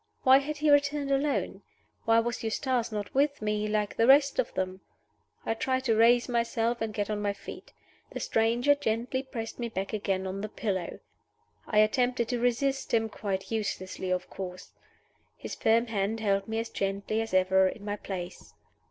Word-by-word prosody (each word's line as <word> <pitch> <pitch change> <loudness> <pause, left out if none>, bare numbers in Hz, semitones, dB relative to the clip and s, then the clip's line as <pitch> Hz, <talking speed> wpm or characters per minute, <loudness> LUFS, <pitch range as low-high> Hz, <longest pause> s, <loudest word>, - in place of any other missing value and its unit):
Why 265 +1 +7
had 295 +2 -4
he 300 0 +2
returned 285 0 +2
alone? 275 +1 0 0.4
Why 225 0 +4
was 235 0 -3
Eustace 235 +1 -1
not 210 -1 -4
with 285 +1 +2
me, 210 0 -1
like 210 -1 -1
the 230 - +3
rest 280 - +5
of - - +1
them? 185 0 -3 0.6
I - - +1
tried 260 +3 -1
to 230 -4 +2
raise 235 +2 +5
myself, 235 -1 0
and 225 -1 -1
get 205 0 -2
on 210 -1 -2
my 205 -1 0
feet. - - -10 0.4
The - - -5
stranger 235 +5 +2
gently 250 -1 -1
pressed 235 -4 -7
me 235 -1 -2
back 195 -2 -4
again 195 -3 -1
on 190 +1 -4
the 215 - -4
pillow. 190 -5 -3 0.7
I 215 - -1
attempted 240 +2 +2
to 245 -1 -1
resist 245 +2 0
him 225 -1 +1
quite 195 -2 -4
uselessly, 190 -4 -3
of 185 0 -1
course. 185 -1 -8 0.7
His - - -7
firm 230 +1 +2
hand 220 -1 -1
held 200 -2 0
me 220 0 -3
as 230 +1 -2
gently 200 +3 -2
as 225 - -5
ever 190 0 +4
in 205 +2 -6
my 205 0 -2
place. 180 - -7
225 Hz, 180 wpm, -28 LUFS, 200-245 Hz, 0.7 s, Why